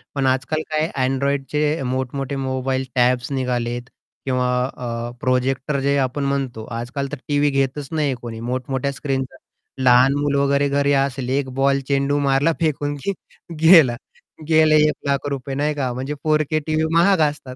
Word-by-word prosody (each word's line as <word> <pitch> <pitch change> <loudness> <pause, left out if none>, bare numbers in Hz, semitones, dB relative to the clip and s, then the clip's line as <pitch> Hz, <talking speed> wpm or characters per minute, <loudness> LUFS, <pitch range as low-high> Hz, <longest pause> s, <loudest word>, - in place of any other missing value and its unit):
पण 140 -1 0
आज-काल 130 +4 0
काय 155 +1 0 0.2
Androidचे 140 +3 0
मोठ 130 0 -2
मोठे 135 0 -3
मोबाईल 130 0 -2
टॅब्स 125 +1 +2
निघाले 125 -3 -1
आहेत. 120 +1 -6 0.4
किंवा 125 -1 0 0.3
अ, 120 -1 -4
प्रोजेक्टर 130 +2 0
जे 140 +1 +1
आपण 135 +1 -1
म्हणतो. 135 -5 -2
आज-काल 120 +4 -4
तर 145 - -4
टीव्ही 145 0 +2
घेतच 135 +1 -1
नाही 150 -4 0
कोणी, 115 -2 -7
मोठमोठ्या 130 +3 -2
स्क्रीन 135 -1 -2 0.6
लहान 125 +1 +5
मुलं 145 -1 0
वगैरे 140 0 +2
घरी 140 0 +1
असेल 135 -2 0
एक 135 0 0
बॉल 140 0 +3
चेंडू 140 0 +1
मारला 140 +3 +2
फेकून 145 -3 -1
की 200 - 0 0.5
गेलं, 160 -7 +7 0.5
गेले 155 -1 +5
₹1,00,000 140 -2 -2
नाही 150 +2 0
का? 135 -3 -1
म्हणजे 130 +4 -4
4K 155 0 +1
टीव्ही 155 0 +1
महाग 180 +2 +4
असतात. 135 -3 -9
135 Hz, 155 wpm, -21 LUFS, 130-145 Hz, 0.6 s, गेलं